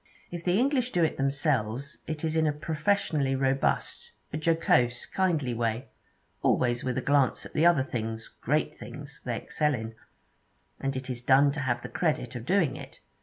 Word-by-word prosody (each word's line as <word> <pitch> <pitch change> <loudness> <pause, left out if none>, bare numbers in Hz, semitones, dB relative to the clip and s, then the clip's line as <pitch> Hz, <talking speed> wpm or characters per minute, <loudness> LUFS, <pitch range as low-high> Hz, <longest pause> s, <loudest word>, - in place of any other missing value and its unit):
If 175 -1 -5
the 180 +2 +2
English 255 -1 +2
do 175 - +3
it 160 - +1
themselves, 135 -2 -1
it 155 0 -4
is 160 0 0
in 160 -1 +3
a - - +3
professionally 150 -2 0
robust, 135 0 0 0.2
a - - -1
jocose, 125 -8 +2
kindly 160 -10 0
way, 115 +2 -2 0.5
always 120 -1 +2
with 130 -1 -1
a - - +1
glance 140 -3 +2
at - - -11
the 165 +3 +4
other 170 -6 +4
things, 110 -3 -4
great - - -1
things, - - -10
they - - -1
excel 150 -2 0
in; 110 -1 -6 0.9
and 135 0 -2
it 130 0 -4
is 120 -1 -5
done 135 +3 +5
to 150 - -4
have 120 -3 -1
the - - -4
credit 160 -5 -1
of 120 0 -6
doing 175 -8 +2
it. - - -11
140 Hz, 180 wpm, -28 LUFS, 125-160 Hz, 0.9 s, done